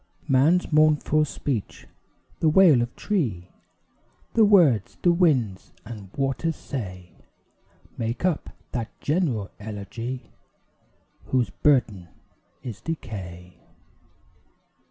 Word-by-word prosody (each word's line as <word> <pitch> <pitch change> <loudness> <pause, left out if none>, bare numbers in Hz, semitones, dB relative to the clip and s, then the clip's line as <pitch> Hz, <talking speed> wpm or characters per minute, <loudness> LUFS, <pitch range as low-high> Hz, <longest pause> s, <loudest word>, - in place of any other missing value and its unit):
Man's 155 +7 +3
mournful 155 0 +4
speech, 130 -6 -4 0.5
the 160 - +3
wail 160 -6 +6
of 120 0 -4
tree, 115 - -2 0.8
The 225 - +5
words 170 - +4
the 175 - +5
winds 135 - +1
and 105 -4 -9
waters 135 +4 -1
say, 90 -12 -7 0.9
Make 115 +8 -2
up 175 -5 0 0.2
that 115 -3 -5
general 140 - -1
elegy, 110 +4 -6 0.9
Whose 125 -3 0
burden 115 -11 +1 0.6
is 115 -6 -7
decay. 90 - -7
130 Hz, 95 wpm, -25 LUFS, 105-155 Hz, 0.9 s, wail